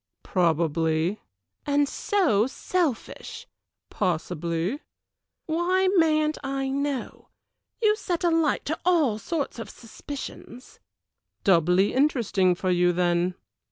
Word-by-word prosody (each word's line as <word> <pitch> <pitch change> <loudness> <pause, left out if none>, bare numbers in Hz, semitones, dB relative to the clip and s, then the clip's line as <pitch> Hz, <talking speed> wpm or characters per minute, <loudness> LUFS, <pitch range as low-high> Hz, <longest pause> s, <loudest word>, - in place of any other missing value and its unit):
"Probably." 165 +1 +1 0.4
"And 285 0 +2
so 275 - +1
selfish." 300 -1 -3 0.5
"Possibly." 175 - -2 0.7
"Why 360 +4 +1
mayn't 310 -3 +2
I 270 0 -2
know? 280 -1 -3 0.6
You 425 -1 +5
set 355 -5 -3
a 345 - +3
light 325 -3 +1
to 315 +3 -2
all 310 -12 +2
sorts 290 -3 -3
of 230 - -6
suspicions." 250 +1 -9 0.6
"Doubly 180 +1 +3
interesting 235 -10 +2
for 185 +1 -1
you, 175 0 +3
then." 175 0 +1
250 Hz, 100 wpm, -25 LUFS, -, 0.7 s, You